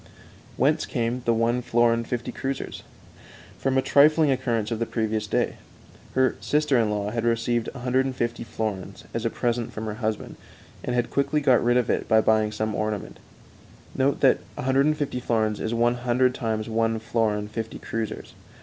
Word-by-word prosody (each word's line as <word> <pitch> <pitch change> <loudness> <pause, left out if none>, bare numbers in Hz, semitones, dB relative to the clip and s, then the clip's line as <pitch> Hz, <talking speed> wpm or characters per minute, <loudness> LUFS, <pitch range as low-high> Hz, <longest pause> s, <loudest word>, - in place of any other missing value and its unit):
Whence 150 +5 +2
came 120 0 -1
the 115 - +3
one 115 +2 +1
florin 115 -1 +2
fifty 120 0 -3
kreuzers? 135 0 -4 0.8
From 135 0 +1
a 130 - +3
trifling 150 +1 +5
occurrence 120 -4 -1
of 115 - -2
the 115 - -1
previous 110 -2 -1
day. - - 0 0.6
Her 130 -1 +2
sister 150 -2 +1
in 110 -2 +2
law 105 0 -2
had 115 0 -2
received 115 0 0
150 125 -2 -1
florins 110 -4 -4
as 115 0 -2
a - - +2
present 120 0 -1
from 110 - -5
her 110 - -3
husband, 110 -1 -3 0.5
and 125 - -2
had 120 -1 0
quickly 140 +2 +1
got 130 -4 +4
rid 120 +1 +3
of 125 - +1
it - - -1
by 110 - +5
buying 110 -1 +2
some 110 0 -2
ornament. 105 -1 -3 0.8
Note 135 +1 +1
that 135 - +5 0.2
150 135 +1 +1
florins 110 -3 0
is 110 - -2
one 120 +1 +2
hundred 125 +1 +2
times 110 -3 -2
one 115 0 +1
florin 110 -2 0
fifty 110 +1 -5
kreuzers. 115 -1 -5
115 Hz, 165 wpm, -25 LUFS, 110-130 Hz, 0.8 s, trifling